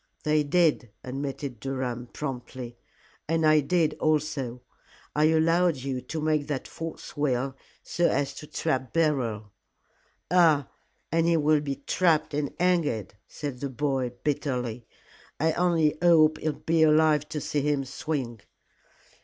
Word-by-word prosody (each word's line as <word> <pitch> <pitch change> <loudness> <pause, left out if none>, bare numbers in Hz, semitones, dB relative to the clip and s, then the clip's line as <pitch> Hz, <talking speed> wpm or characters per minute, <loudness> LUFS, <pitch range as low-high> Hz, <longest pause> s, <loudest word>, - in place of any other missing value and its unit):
"They 155 0 +3
did," 150 -5 +2
admitted 135 -1 -5
Durham, 125 -2 -3
promptly, 125 -3 -6 0.5
"and 165 0 +1
I 155 0 +6
did 155 +1 +1
also. 145 -5 -1 0.5
I 150 +1 +4
allowed 165 +2 +3
you 130 -1 -4
to 160 - -5
make 155 -1 0
that 145 -3 -3
false 165 -2 -7
will, 135 -2 0 0.3
so 175 0 +1
as 140 -1 0
to 150 - -8
trap 130 -7 -2
Beryl." 125 -10 0 0.8
"Ah! 160 -6 +4 0.4
and 165 0 +2
he 170 -1 +4
will 150 -1 +3
be 140 -2 -3
trapped 165 -5 +2
and 145 -1 -1
hanged," 165 - +1
said 140 -4 -6
the 140 - -3
boy, 130 -1 -1
bitterly. 125 -5 -2 0.5
"I 160 +1 +2
only 165 -3 +2
hope 160 -3 +5
I'll 155 -1 0
be 165 +2 0
alive 155 -1 +4
to 150 - -3
see 145 +1 -1
him 145 -1 0
swing." 130 -4 -4
150 Hz, 135 wpm, -27 LUFS, 130-160 Hz, 0.8 s, I